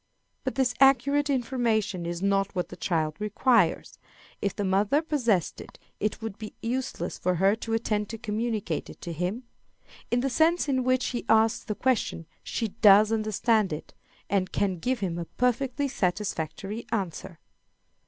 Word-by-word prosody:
But 260 Hz, -, -3 dB
this 260 Hz, -2 st, +2 dB
accurate 275 Hz, +2 st, +4 dB
information 230 Hz, -8 st, 0 dB
is 175 Hz, +2 st, -4 dB
not 195 Hz, 0 st, +1 dB
what 180 Hz, -, -2 dB
the -, -, -8 dB
child 155 Hz, -4 st, -1 dB
requires. 210 Hz, -3 st, +1 dB, 0.4 s
If 200 Hz, -, -1 dB
the 205 Hz, -, -2 dB
mother 200 Hz, +9 st, +2 dB
possessed 245 Hz, -, 0 dB
it, -, -, -13 dB, 0.2 s
it 215 Hz, +2 st, -2 dB
would 220 Hz, -2 st, -5 dB
be 215 Hz, -1 st, -8 dB
useless 240 Hz, -6 st, -3 dB
for 180 Hz, 0 st, +1 dB
her 195 Hz, +4 st, +3 dB
to 225 Hz, 0 st, -4 dB
attempt 210 Hz, -2 st, 0 dB
to 225 Hz, -, -5 dB
communicate 220 Hz, -1 st, -2 dB
it -, -, -12 dB
to 170 Hz, -, -5 dB
him. 180 Hz, +9 st, -3 dB, 0.7 s
In 240 Hz, +1 st, +1 dB
the 270 Hz, -, 0 dB
sense 325 Hz, +4 st, +3 dB
in 260 Hz, -2 st, +1 dB
which 255 Hz, 0 st, +1 dB
he 240 Hz, -, -3 dB
asks 220 Hz, +1 st, +4 dB
the 210 Hz, -, -4 dB
question 240 Hz, -10 st, 0 dB, 0.2 s
she 225 Hz, -, -3 dB
does 205 Hz, +2 st, +6 dB
understand 215 Hz, -1 st, +1 dB
it, 150 Hz, -, -6 dB, 0.3 s
and 190 Hz, -2 st, 0 dB
can 190 Hz, -4 st, 0 dB
give 250 Hz, +6 st, -1 dB
him 175 Hz, -3 st, -2 dB
a 170 Hz, -, -4 dB
perfectly 255 Hz, -, 0 dB
satisfactory 195 Hz, -, -3 dB
answer. 190 Hz, -3 st, -3 dB
215 Hz, 165 wpm, -27 LUFS, 195-250 Hz, 0.7 s, does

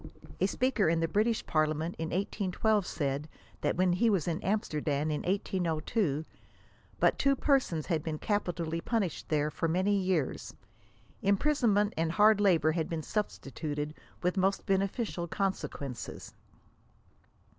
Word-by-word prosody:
A 190 Hz, -, +3 dB
speaker 245 Hz, -4 st, +1 dB
in 165 Hz, 0 st, +2 dB
the 165 Hz, -, +1 dB
British 220 Hz, +5 st, +1 dB
Parliament 155 Hz, +1 st, 0 dB
in 160 Hz, -, -2 dB
1812 200 Hz, +2 st, 0 dB
said, 145 Hz, 0 st, -2 dB, 0.3 s
that -, -, +1 dB
when 180 Hz, -1 st, +3 dB
he 225 Hz, +6 st, +3 dB
was 195 Hz, -6 st, +1 dB
in 165 Hz, -1 st, -1 dB
Amsterdam 155 Hz, -7 st, 0 dB
in 150 Hz, -, -1 dB
1802, 175 Hz, -3 st, -1 dB, 0.7 s
but -, -, +3 dB
two 275 Hz, 0 st, +4 dB
persons 260 Hz, -, +1 dB
had 165 Hz, -4 st, 0 dB
been 155 Hz, -1 st, -3 dB
capitally 170 Hz, -4 st, -1 dB
punished 205 Hz, -7 st, -2 dB
there 150 Hz, -1 st, +1 dB
for 165 Hz, -, -1 dB
many 185 Hz, +5 st, +2 dB
years. 185 Hz, -7 st, -1 dB, 0.7 s
Imprisonment 210 Hz, -1 st, +2 dB
and 165 Hz, 0 st, 0 dB
hard 210 Hz, +2 st, +5 dB
labor 170 Hz, -6 st, +4 dB
had 160 Hz, 0 st, -2 dB
been 160 Hz, -2 st, -3 dB
substituted, 150 Hz, -7 st, -3 dB, 0.3 s
with 180 Hz, +2 st, +1 dB
*^mo8t 195 Hz, +1 st, +1 dB
&en«/^ctaZ 195 Hz, -2 st, -1 dB
consequences." 150 Hz, -, -4 dB
180 Hz, 135 wpm, -30 LUFS, 155-205 Hz, 0.7 s, hard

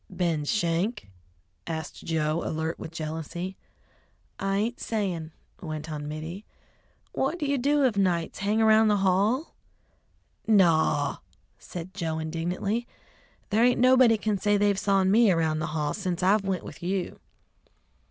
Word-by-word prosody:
"Ben 165 Hz, -5 st, -1 dB
Schenk?" 170 Hz, -, -1 dB, 0.6 s
asked 160 Hz, -2 st, -5 dB
Joe, 155 Hz, 0 st, 0 dB
alert 160 Hz, +1 st, -3 dB
with 160 Hz, -, -7 dB
jealousy. 165 Hz, +3 st, -5 dB, 0.8 s
"I 195 Hz, 0 st, 0 dB
ain't 230 Hz, +4 st, -1 dB
sayin'," 185 Hz, -8 st, -3 dB, 0.3 s
went 155 Hz, -2 st, -6 dB
on 150 Hz, -1 st, -5 dB
Mittie. 160 Hz, +6 st, -6 dB, 0.7 s
"What 275 Hz, +6 st, -1 dB
do 305 Hz, -, -3 dB
you 280 Hz, -1 st, 0 dB
do 285 Hz, +3 st, +2 dB
of 240 Hz, -6 st, +2 dB
nights, 175 Hz, -4 st, 0 dB
hang 210 Hz, +3 st, +1 dB
around 220 Hz, 0 st, +5 dB
the 210 Hz, -1 st, +3 dB
hall?" 210 Hz, -, +1 dB, 0.9 s
"Naw," 160 Hz, -8 st, +3 dB, 0.4 s
said 180 Hz, +1 st, -8 dB
Joe 165 Hz, -4 st, -3 dB
indignantly. 175 Hz, +8 st, -2 dB, 0.6 s
"There 220 Hz, +3 st, +3 dB
ain't 245 Hz, 0 st, +3 dB
nobody 255 Hz, -2 st, +6 dB
can 210 Hz, -1 st, -1 dB
say 205 Hz, +1 st, +2 dB
they've 205 Hz, -1 st, +2 dB
sawn 195 Hz, -1 st, +2 dB
me 225 Hz, +1 st, +5 dB
around 160 Hz, -3 st, +1 dB
the 155 Hz, -, -2 dB
hall 150 Hz, -1 st, -1 dB
sence 185 Hz, -3 st, -3 dB
I've 195 Hz, +2 st, +3 dB
went 190 Hz, -2 st, -1 dB
with 145 Hz, -, -10 dB
you!" 185 Hz, +1 st, -3 dB
185 Hz, 145 wpm, -27 LUFS, 160-215 Hz, 0.9 s, nobody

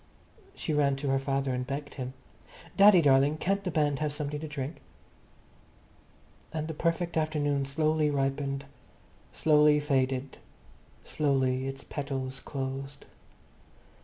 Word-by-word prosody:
She 155 Hz, -, -3 dB
ran 140 Hz, -2 st, +3 dB
to 140 Hz, +1 st, -3 dB
her 135 Hz, 0 st, +2 dB
father 135 Hz, -1 st, -1 dB
and 125 Hz, 0 st, -3 dB
begged 145 Hz, +1 st, -5 dB
him. 130 Hz, -1 st, -5 dB, 0.6 s
"Daddy 195 Hz, -3 st, +7 dB
darling, 140 Hz, +2 st, +4 dB
can't 195 Hz, +4 st, 0 dB
the 185 Hz, -, -2 dB
band 150 Hz, -4 st, +1 dB
have 150 Hz, -1 st, -1 dB
something 150 Hz, 0 st, -3 dB
to 155 Hz, -, -6 dB
drink?" 145 Hz, 0 st, -5 dB, 1.7 s
And 155 Hz, -1 st, -3 dB
the 160 Hz, -, -4 dB
perfect 170 Hz, +2 st, -1 dB
afternoon 145 Hz, -3 st, 0 dB
slowly 155 Hz, +2 st, +1 dB
ripened, 140 Hz, 0 st, -1 dB, 0.7 s
slowly 150 Hz, -1 st, +4 dB
faded, 135 Hz, -2 st, -1 dB, 0.6 s
slowly 135 Hz, -3 st, 0 dB
its 135 Hz, 0 st, -6 dB
petals 135 Hz, -2 st, -4 dB
closed. 135 Hz, +1 st, -5 dB
145 Hz, 125 wpm, -29 LUFS, 135-155 Hz, 1.7 s, Daddy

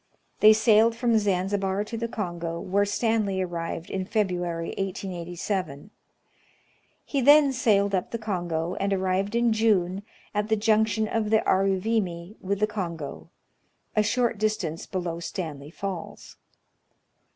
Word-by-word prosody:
They 215 Hz, -, +8 dB
sailed 220 Hz, +1 st, +4 dB
from 235 Hz, -1 st, +2 dB
Zanzibar 195 Hz, 0 st, 0 dB
to 215 Hz, +2 st, -7 dB
the 230 Hz, +1 st, -2 dB
Kongo, 175 Hz, -7 st, -4 dB
where 200 Hz, +3 st, +1 dB
Stanley 205 Hz, -2 st, 0 dB
arrived 170 Hz, -2 st, -4 dB
in 190 Hz, -, -2 dB
February, 180 Hz, -5 st, -1 dB
1887. 180 Hz, -2 st, -4 dB, 1.1 s
He 275 Hz, -, -1 dB
then 285 Hz, +1 st, +6 dB
sailed 200 Hz, -5 st, +2 dB
up 185 Hz, -2 st, 0 dB
the 230 Hz, -, -3 dB
Kongo, 175 Hz, -6 st, -2 dB
and 200 Hz, 0 st, 0 dB
arrived 190 Hz, +2 st, 0 dB
in 235 Hz, -1 st, +3 dB
June 200 Hz, -4 st, +2 dB, 0.3 s
at 210 Hz, 0 st, -1 dB
the 220 Hz, -, +4 dB
junction 220 Hz, 0 st, +2 dB
of 215 Hz, -1 st, -1 dB
the 220 Hz, 0 st, +4 dB
Aruvimi 190 Hz, -1 st, 0 dB
with 200 Hz, +1 st, -2 dB
the -, -, +5 dB
Kongo, 170 Hz, -8 st, -5 dB, 0.7 s
a 215 Hz, -, +4 dB
shoi't 230 Hz, +1 st, 0 dB
distance 200 Hz, -7 st, -2 dB
below 175 Hz, -3 st, -3 dB
Stanley 155 Hz, -5 st, -5 dB
Falls. 185 Hz, 0 st, -7 dB
200 Hz, 130 wpm, -26 LUFS, 180-220 Hz, 1.1 s, They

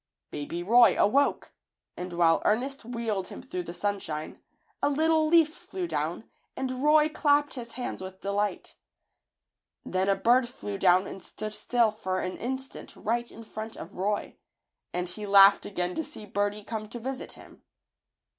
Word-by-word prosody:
Baby 150 Hz, +4 st, -4 dB
Roy 235 Hz, +6 st, +6 dB
awoke, 280 Hz, +7 st, +2 dB, 0.4 s
and 180 Hz, 0 st, -6 dB
while 170 Hz, -1 st, +4 dB
Ernest 260 Hz, +6 st, 0 dB
wheeled 225 Hz, -5 st, -3 dB
him -, -, -8 dB
through 180 Hz, -, -4 dB
the 170 Hz, -, -7 dB
sunshine, 175 Hz, -5 st, -4 dB, 0.4 s
a 285 Hz, -, +3 dB
little 315 Hz, +2 st, +3 dB
leaf 320 Hz, -1 st, +5 dB
flew 360 Hz, 0 st, -5 dB
down -, -, -3 dB, 0.3 s
and 255 Hz, -1 st, -3 dB
Roy 300 Hz, 0 st, +6 dB
clapped 290 Hz, -1 st, +2 dB
his 235 Hz, -3 st, -7 dB
hands 245 Hz, -5 st, -5 dB
with 190 Hz, 0 st, -8 dB
delight. 200 Hz, +1 st, -2 dB, 1.1 s
Then 190 Hz, +1 st, 0 dB
a 195 Hz, -, +4 dB
bird 240 Hz, +5 st, +3 dB
flew 205 Hz, -5 st, -6 dB
down 185 Hz, 0 st, +5 dB
and 195 Hz, -, -8 dB
stood 215 Hz, +3 st, -6 dB
still 235 Hz, 0 st, +2 dB
for 190 Hz, -3 st, -3 dB
an 185 Hz, -, -3 dB
instant 265 Hz, +2 st, -6 dB
right 235 Hz, +2 st, -2 dB
in 230 Hz, -, -11 dB
front 220 Hz, 0 st, -7 dB
of 175 Hz, -, -9 dB
Roy, 205 Hz, +3 st, -2 dB, 0.5 s
and 180 Hz, 0 st, -2 dB
he 205 Hz, +4 st, -6 dB
laughed 200 Hz, 0 st, +7 dB
again 180 Hz, -2 st, -2 dB
to 320 Hz, -, -2 dB
see 295 Hz, -8 st, -9 dB
birdie 205 Hz, +1 st, -1 dB
come 215 Hz, 0 st, -5 dB
to 240 Hz, -, -7 dB
visit 260 Hz, +3 st, -5 dB
him. -, -, -15 dB
215 Hz, 165 wpm, -28 LUFS, 190-260 Hz, 1.1 s, laughed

